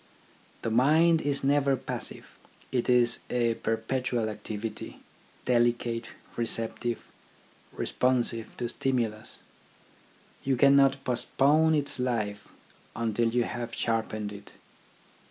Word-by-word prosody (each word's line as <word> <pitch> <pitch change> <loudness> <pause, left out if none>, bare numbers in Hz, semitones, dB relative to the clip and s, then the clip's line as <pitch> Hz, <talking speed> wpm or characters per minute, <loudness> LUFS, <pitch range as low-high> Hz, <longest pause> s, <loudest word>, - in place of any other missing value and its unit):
The 115 - -1
mind 160 +7 +4
is 145 -2 -1
never 140 0 +3
passive; - - -6 0.4
it 125 -2 0
is 120 -1 +4
a 120 -2 +1
perpetual 115 +1 -1
activity, 105 0 -6 0.5
delicate, 120 -1 +1 0.3
receptive, 115 0 -2 0.7
responsive 120 -3 0
to 120 - -2
stimulus. 115 -4 -2 1.0
You 135 0 +1
cannot 140 +1 +5
postpone 145 +5 +3
its 145 -3 0
life 110 -5 -2 0.5
until 115 0 0
you 120 +1 +1
have 120 0 -5
sharpened 110 -2 -2
it. 100 0 -12
120 Hz, 100 wpm, -28 LUFS, 115-135 Hz, 1.0 s, cannot